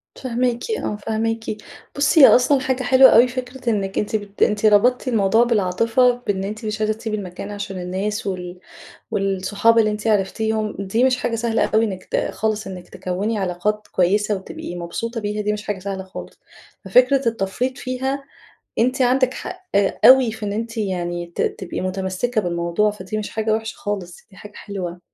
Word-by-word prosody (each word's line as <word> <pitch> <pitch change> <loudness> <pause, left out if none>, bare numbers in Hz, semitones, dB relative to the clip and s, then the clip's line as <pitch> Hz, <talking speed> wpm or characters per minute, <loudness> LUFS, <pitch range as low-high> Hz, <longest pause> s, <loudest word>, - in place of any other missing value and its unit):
فاهماكِ 250 - -2
آه، 325 - -2
فاهماكِ. 225 +1 -2 0.5
بُصي، 285 +2 +4
هي - - +11
أصلًا 260 +3 +5
حاجة 260 0 -1
حلوة 260 +1 +7
أوي 240 +2 +6
فكرة 250 0 -5
إنِك 195 -3 -1
أنتِ 210 +1 -2
بت 205 -1 -5
أنتِ 210 +1 +1
ربطتِ 240 +5 +4
الموضوع 225 0 +3
بالعاطفة، 230 +3 +2 0.2
بإن 195 -1 0
أنتِ 215 +3 -5
مش 215 0 -3
عايزة 215 0 +2
تسيبي 220 -1 -4
المكان 195 +1 -7
عشان 200 -2 -5
الناس، 200 +4 -3
وال 180 -1 -5 0.5
والصحاب 195 +4 +2
اللي 215 -1 +3
أنتِ 210 +1 -4
عرفتيهم، 215 +1 0
دي 200 +5 0
مش 255 -1 +3
حاجة 230 -2 -2
سهلة 230 0 +1
أوي 220 +1 +2
إنِك 190 -3 -5
ت - - 0
خالص 215 -1 -2
إنِك 180 -2 -9
تكوّني 190 +4 -3
علاقات 195 +3 -2
كويسة 205 +3 +2
وتبقي 190 -2 -7
مبسوطة، 220 +7 -4
بيها 210 0 -2
دي 210 0 0
مش 210 0 -5
حاجة 205 -2 -3
سهلة 195 0 -5
خالص، 190 0 -10 0.5
ففكرة 250 +5 +4
التفريط 230 +4 -1
فيها، 265 +2 -3 0.6
أنتِ 255 +3 +2
عندك 255 +1 +3
حق 365 +1 -7 0.4
أوي 255 -3 +7
في 220 -1 -6
إن 200 - -2
أنتِ 230 +2 -4
يعني 175 -4 -2
ت - - -1
تبقي 185 -2 -3
متمسكة 190 +5 -1
بالموضوع، 170 +4 0
فدي 210 +1 -6
مش 210 - -4
حاجة 220 0 -1
وحشة 220 0 -3
خالص، 190 -4 -5
دي 195 - -19
حاجة 210 - -11
حلوة. 180 -3 -6
215 Hz, 175 wpm, -21 LUFS, 195-235 Hz, 0.6 s, هي